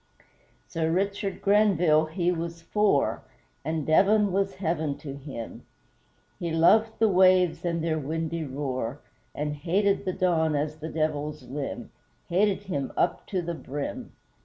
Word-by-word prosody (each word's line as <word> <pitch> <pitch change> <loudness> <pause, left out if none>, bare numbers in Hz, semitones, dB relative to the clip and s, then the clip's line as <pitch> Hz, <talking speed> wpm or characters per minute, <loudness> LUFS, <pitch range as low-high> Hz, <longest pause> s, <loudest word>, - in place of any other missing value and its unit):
Sir 160 -1 -1
RICHARD 195 +2 -1
GRENVILLE, 180 -7 +4
he 175 +2 0
was 170 -1 -4
FOUR 205 -6 +1 0.4
And 160 0 -2
Devon 200 +5 +4
was 195 +1 0
heaven 160 -5 -1
to 140 -3 -7
him, 135 -5 -8 0.8
He 170 - -2
loved 215 +8 +4
the 225 - +4
waves 185 -2 +4
and 170 -2 -1
their 160 -1 0
windy 160 +3 -3
roar 130 -2 -3 0.4
And 150 0 -2
hated 195 +6 +1
the 185 - -1
Don 160 -4 +1
as 150 +1 -2
the 160 +1 -6
Devil's 150 -2 -2
limb 135 +2 -5 0.4
Hated 200 +3 +2
him 145 -9 -3
up 170 - 0
to 185 -3 -2
the 170 +1 -3
brim! 145 -3 -6
165 Hz, 140 wpm, -27 LUFS, 150-185 Hz, 0.8 s, GRENVILLE